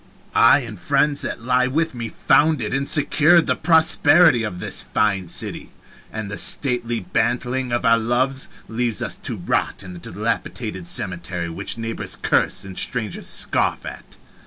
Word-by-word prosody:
I 145 - +5
and 110 -6 -9
friends 140 +8 +1
that 115 - -4
lie 125 +1 +1
with 160 +4 -1
me 115 -2 -6
founded 145 -8 +1
and 140 +1 -1
secured 155 +3 +5
the 130 - 0
prosperity 160 -3 +4
of 105 -5 -5
this - - -1
fine 100 -4 -1
city, - - -3 0.4
and 110 -2 -6
the 100 - -3
stately 120 -4 +1
bantling 125 +5 -2
of 120 +1 -1
our 115 0 +4
loves 130 +4 0 0.2
leaves 115 -1 -2
us - - -2
to - - -6
rot - - -2
in 90 -1 -10
a - - -9
dilapidated 105 0 -4
cemetery 90 -1 -3
which 100 +6 -4
neighbors 115 0 -3
curse 95 +1 0
and 95 -1 -5
strangers 110 -6 -3
scoff - - 0
at. - - -10
120 Hz, 160 wpm, -21 LUFS, 105-135 Hz, 0.4 s, I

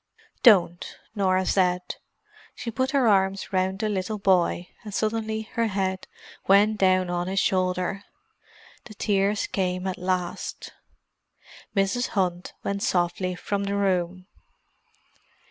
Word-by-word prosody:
"Don't!" 180 -7 +4 0.2
Norah 190 -3 +1
said. 180 -1 +1 0.6
She 230 - -5
put 260 +3 0
her 270 -3 +2
arms 195 -1 +1
round 190 0 +1
the 215 +1 -1
little 205 +1 -2
boy—and 190 +1 0
suddenly 220 0 -1
her 230 -1 +1
head 190 -2 -2 0.4
went 205 +2 +4
down 185 -1 +3
on 175 0 -2
his 195 +1 0
shoulder. 185 +1 0 0.8
The 215 - -11
tears 200 0 +1
came 185 -1 -2
at 190 -1 -3
last. 180 -1 -3 1.0
Mrs. 200 +5 +1
Hunt 180 -2 -1
went 200 0 -2
softly 180 0 0
from 200 +2 -2
the 200 0 -1
room. 185 -2 0
190 Hz, 120 wpm, -25 LUFS, 185-205 Hz, 1.0 s, Don't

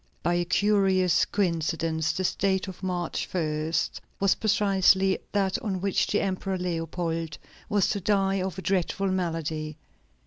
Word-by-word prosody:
By 175 - +2
a 175 0 +1
curious 190 -2 +3
coincidence, 165 -4 0
this 185 -1 -1
date 190 0 0
of 190 - -9
March 180 -3 -2
1 155 -2 -1 0.5
was 195 -1 +4
precisely 195 -3 +3
that 195 -2 +1
on 195 -4 -2
which 195 +1 +1
the 210 - +1
Emperor 190 0 -2
Leopold 165 -2 -3 0.3
was 205 -3 +2
to 200 - -1
die 195 0 +1
of 185 -2 -3
a 190 - -6
dreadful 195 +1 0
malady. 160 -4 -2
185 Hz, 140 wpm, -27 LUFS, 165-195 Hz, 0.5 s, was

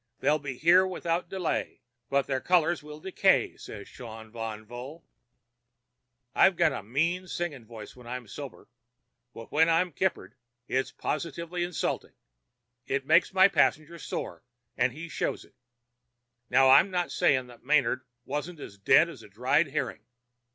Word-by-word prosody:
They'll 155 +1 +2
be 135 -3 -6
here 180 +5 +5
without 175 -1 -2
delay. 190 -3 -3 0.3
'But 140 0 +2
their 130 -1 -2
colors 175 -1 +2
will 150 0 -10
decay,' 190 +2 +2
said 105 - -9
the - - -11
Shaun 110 -2 -10
Van 110 -1 -6
Vocht." 125 +8 -9 1.3
"I've 190 - +5
got 160 - +3
a - - -4
mean 165 - -1
singing 160 -9 -4
voice 110 -2 -10
when 125 -1 -14
I'm 125 -1 -6
sober, 140 +5 -9 0.6
but 115 -1 -11
when 160 +2 +4
I'm 170 +2 +2
kippered 190 +1 -2 0.3
it's 130 +1 -1
positively 170 +2 -3
insulting. 175 -2 -3 0.7
It 135 0 -1
makes 160 +5 +4
my 190 0 +6
passenger 170 -3 +1
sore, - - -5 0.3
and 125 +1 +2
he 155 +6 -8
shows - - -3
it. - - -25 1.0
Now, 130 +1 +6
I'm 170 +8 +7
not 180 -2 -1
saying 130 -2 +2
that 120 -1 -15
Manard 130 -2 +2 0.2
wasn't 150 +4 -4
as 100 -7 -10
dead 165 +11 +5
as 165 -9 -10
a - - -14
dried 125 +9 +2
herring. 135 -7 -3
150 Hz, 155 wpm, -28 LUFS, 125-170 Hz, 1.3 s, I'm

